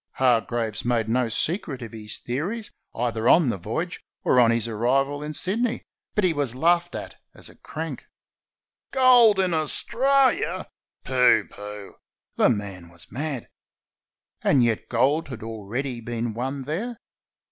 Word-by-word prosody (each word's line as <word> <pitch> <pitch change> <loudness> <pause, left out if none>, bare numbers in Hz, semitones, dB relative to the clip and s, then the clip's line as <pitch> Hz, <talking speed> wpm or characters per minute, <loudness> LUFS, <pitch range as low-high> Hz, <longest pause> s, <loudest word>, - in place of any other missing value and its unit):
Hargraves 115 -3 +1
made 120 -2 +1
no 120 +1 +1
secret 145 - -1
of 115 - -8
his 105 -1 -7
theories 180 - -4 0.2
either 115 -1 0
on 160 -6 +6
the 110 - -1
voyage 160 - -4 0.2
or 125 - +4
on 120 -2 +6
his 115 -1 +1
arrival 135 +6 0
in 150 +1 -4
Sydney, 225 +8 -1 0.3
but 210 - +2
he 180 -3 +3
was 140 -5 -1
laughed 175 +4 +2
at - - -7 0.2
as - - -10
a - - -16
crank. - - -7 0.8
"Gold 250 -5 +6
in 185 -2 +1
Australia! 235 - +2 0.4
Pooh, 125 -5 +4
pooh!" 105 -1 -9 0.4
The - - +4
man 100 -6 -3
was 85 0 -12
mad. 140 -2 -3 0.9
And 135 -4 +4
yet 115 -2 0
gold 135 +7 +2
had 125 -5 -8
already 115 +4 -4
been 115 0 -3
won 135 +4 -3
there. 205 - -4
130 Hz, 145 wpm, -24 LUFS, 115-170 Hz, 0.9 s, on